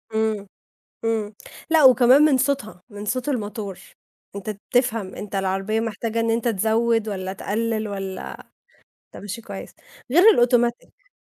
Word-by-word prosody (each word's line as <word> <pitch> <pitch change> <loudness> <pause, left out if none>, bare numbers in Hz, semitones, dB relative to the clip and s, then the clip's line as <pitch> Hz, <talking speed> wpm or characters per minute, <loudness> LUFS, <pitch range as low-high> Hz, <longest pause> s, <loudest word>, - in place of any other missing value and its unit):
امم، 220 -2 0 0.6
امم، 220 -2 -1 0.4
لأ، 320 -3 +5
وكمان 255 +2 +7
من 300 -3 +5
صوتها، 265 -9 -1
من 205 0 -8
صوت 250 +5 -2
الموتور، 210 -6 -4 0.6
أنت 200 +2 -5
بتفهم، 220 -1 -1
أنت 205 -1 -8
العربية 195 +3 -1
محتاجة 225 0 -2
إن 230 0 +1
أنت 230 +1 0
تزوّد 225 +1 +1
والَّا 190 -2 -4
تقلّل 220 +2 -2
والَّا 195 -2 -5 0.9
أنت - - -9
ماشي 210 +3 -6
كويس، 200 -3 -9 0.4
غير 345 +7 +5 0.2
الautomatic. 240 - -1
220 Hz, 135 wpm, -23 LUFS, 205-240 Hz, 0.9 s, وكمان